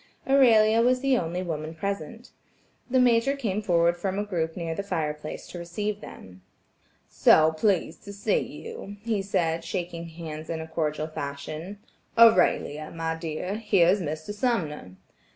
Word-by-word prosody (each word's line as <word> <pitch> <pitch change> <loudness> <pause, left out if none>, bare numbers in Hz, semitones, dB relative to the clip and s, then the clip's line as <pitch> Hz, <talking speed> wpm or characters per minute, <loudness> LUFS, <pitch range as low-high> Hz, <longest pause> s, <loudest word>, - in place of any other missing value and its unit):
Aurelia 230 -5 +5
was 250 +1 +3
the 275 -1 +3
only 175 -3 -2
woman 160 -2 -4
present. 200 +5 -5 0.6
The 260 +1 +3
Major 245 +2 +3
came 215 -7 -2
forward 170 -3 +3
from 190 +2 -2
a 205 - 0
group 165 -5 -3
near 165 -2 -3
the 180 - -3
fire 160 -6 -2
place 150 0 -8
to 175 - -7
receive 205 +5 -4
them. 95 0 -12 0.7
"So 155 0 +5
pleased 170 0 0
to 200 - -7
see 205 - +1
you," 460 - -8
he 225 -3 0
said, 165 -4 -1
shaking 170 -1 -4
hands 160 -1 -8
in 165 - -3
his 160 0 -8
cordial 155 -1 -1
fashion. 155 +5 -6 0.4
"Aurelia, 180 -9 +4
my 165 -1 -3
dear, 165 +4 -4
here 195 -6 +3
is 195 +2 +3
Mr. 155 +4 -4
Sumner." 175 - -2
175 Hz, 155 wpm, -26 LUFS, 160-210 Hz, 0.7 s, Aurelia